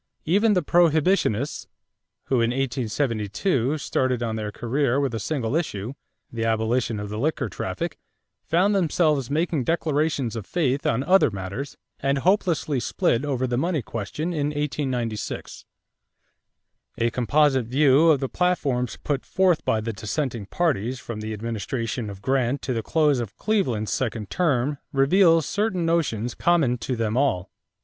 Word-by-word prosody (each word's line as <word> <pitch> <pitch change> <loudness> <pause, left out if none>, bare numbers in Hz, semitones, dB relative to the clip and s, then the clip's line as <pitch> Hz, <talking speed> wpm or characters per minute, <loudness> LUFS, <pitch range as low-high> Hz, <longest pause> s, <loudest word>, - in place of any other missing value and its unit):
Even 205 +6 +3
the 180 -3 +1
Prohibitionists, 160 - +2 0.6
who 130 -3 +1
in 115 - +2
1872 125 - -1
started 130 -3 -1
on 110 -1 -2
their 105 -1 -3
career 130 +3 0
with 135 -4 0
a 115 - -2
single 130 0 -2
issue, 120 - -2 0.4
the 115 -1 -3
abolition 115 0 0
of 105 0 -5
the 105 +1 -4
liquor 155 +6 0
traffic, - - -4 0.4
found 185 +5 +2
themselves 155 -7 +1
making 155 -1 0
declarations 150 -5 0
of 110 -4 -6
faith 140 -5 0
on 115 +3 +1
other 185 0 +5
matters 100 +7 -6 0.2
and 135 0 +1
hopelessly 165 -4 +1
split 120 +1 0
over 130 -3 -1
the 120 -1 -1
money 165 -3 0
question 120 - -4
in 145 -3 0
1896. 135 -7 -3 1.3
A 115 0 +1
composite 130 +1 +2
view 140 +4 +4
of 150 -4 +4
the 135 - 0
platforms 135 -9 0
put 140 -3 -1
forth 185 -4 +2
by 110 - +1
the 110 +1 -3
dissenting 105 +2 -3
parties 130 - 0
from 115 -3 -6
the 110 0 -4
administration 115 +1 -3
of 100 0 -10
Grant 135 0 0
to 130 - -1
the 115 - -1
close 150 0 +2
of 115 -4 -6
Cleveland's 130 - 0
second 110 -5 -3
term 145 -4 +1
reveals 165 +3 +4
certain 200 -3 -1
notions 125 -9 0
common 150 -9 +2
to 125 +2 -2
them 110 -1 -1
all. 115 -10 +1
135 Hz, 150 wpm, -24 LUFS, 115-155 Hz, 1.3 s, other